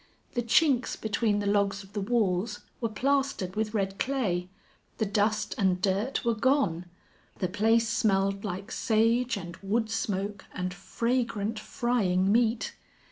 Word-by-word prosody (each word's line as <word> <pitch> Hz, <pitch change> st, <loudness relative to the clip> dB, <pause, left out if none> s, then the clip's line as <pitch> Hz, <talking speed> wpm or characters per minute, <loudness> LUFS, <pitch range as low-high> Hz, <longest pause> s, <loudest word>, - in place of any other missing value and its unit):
The 240 Hz, -, 0 dB
chinks 255 Hz, +2 st, +3 dB
between 215 Hz, -1 st, +1 dB
the 205 Hz, -, -2 dB
logs 200 Hz, 0 st, +1 dB
of 195 Hz, +1 st, -17 dB
the 205 Hz, -, -2 dB
walls 210 Hz, -1 st, 0 dB, 0.2 s
were 230 Hz, -, -1 dB
plastered 270 Hz, -5 st, 0 dB
with 215 Hz, 0 st, -1 dB
red 195 Hz, -1 st, -1 dB
clay; 195 Hz, -10 st, -1 dB, 0.5 s
the 220 Hz, -, +1 dB
dust 210 Hz, +1 st, +1 dB
and 185 Hz, -3 st, +2 dB
dirt 200 Hz, +8 st, 0 dB
were 235 Hz, -, +3 dB
gone; 215 Hz, -, +1 dB, 0.5 s
the 185 Hz, -, 0 dB
place 225 Hz, +4 st, +2 dB
smelled 195 Hz, -3 st, +1 dB
like 200 Hz, +2 st, -5 dB
sage 230 Hz, +1 st, +2 dB
and 175 Hz, -3 st, -7 dB
wood 220 Hz, +3 st, -1 dB
smoke 205 Hz, -2 st, -2 dB
and 180 Hz, -1 st, -2 dB
fragrant, 230 Hz, +2 st, -1 dB
frying 200 Hz, -6 st, +1 dB
meat. 230 Hz, 0 st, +2 dB
210 Hz, 140 wpm, -28 LUFS, 195-230 Hz, 0.5 s, chinks